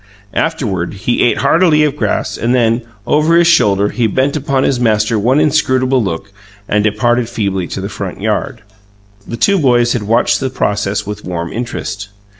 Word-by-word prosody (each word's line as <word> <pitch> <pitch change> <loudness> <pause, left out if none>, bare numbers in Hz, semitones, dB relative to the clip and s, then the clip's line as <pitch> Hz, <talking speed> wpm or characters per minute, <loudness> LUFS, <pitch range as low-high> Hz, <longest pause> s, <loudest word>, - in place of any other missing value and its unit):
Afterward, 105 - -2
he 100 +5 -1
ate 120 - +2
heartily 160 -3 +3
of 150 -2 0
grass; - - -2
and 120 +2 0
then, 115 -1 +2 0.2
over 155 +3 +2
his 170 - +4
shoulder, 100 - +3
he 120 -3 0
bent 130 +7 0
upon 140 -2 0
his 130 - +1
master 110 -1 +1
one 125 +7 +2
inscrutable 130 -4 +2
look 95 +1 -4 0.4
and 105 0 +1
departed 120 +3 +1
feebly 100 -6 -2
to - - -5
the 95 - -4
front 100 -3 -6
yard. 110 +3 -2 0.6
The 115 - -5
two 200 +9 +2
boys 120 -4 +3
had 120 - -2
watched 115 +4 +1
the 130 - -2
process 100 -5 -1
with 105 +1 -6
warm 85 -2 -5
interest. 105 -4 -5
120 Hz, 175 wpm, -15 LUFS, 105-135 Hz, 0.6 s, his